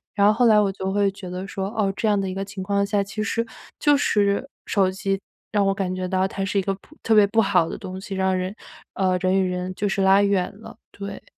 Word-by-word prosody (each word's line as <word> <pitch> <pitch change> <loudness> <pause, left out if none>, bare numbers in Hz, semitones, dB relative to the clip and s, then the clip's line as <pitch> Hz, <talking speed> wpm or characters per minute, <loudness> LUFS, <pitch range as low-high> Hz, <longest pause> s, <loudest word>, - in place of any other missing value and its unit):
然 200 -1 +4
后 210 - +5
后 240 +2 +3
来 215 -1 +6
我 200 -2 +2
就 190 0 -3
会 200 -1 +2
觉 190 -2 -9
得 185 +2 -5
说， 195 0 -3
哦， 205 -3 0
这 220 - -1
样 205 -1 +3
的 195 - -1
一 - - -4
个 195 +1 -3
情 195 -1 -7
况 200 +1 +1
下， 200 0 +1
其 200 +2 -5
实 230 +1 -1 0.3
就 290 -1 +4
是 205 -1 +1 0.2
手 190 -2 +2
机 195 0 -2 0.3
让 205 -2 +2
我 195 - +3
感 190 -2 -2
觉 185 0 -3
到 185 +1 +1
它 195 0 -4
是 195 +1 0
一 - - +2
个 195 +1 -1
不 250 +10 -20
特 225 - +3
别 210 -1 +7
不 225 +2 +3
好 185 -5 +2
的 - - -5
东 185 0 -7
西， 195 0 -7
让 190 -1 +1
人 185 +2 -3 0.4
呃， 185 -1 +1
人 190 +1 +2
与 185 - 0
人 180 +1 -3
就 205 - -1
是 195 - 0
拉 195 +1 +5
远 200 -3 +1
了， - - -11
对。 200 0 -7
195 Hz, 285 characters per minute, -23 LUFS, 190-205 Hz, 0.4 s, 别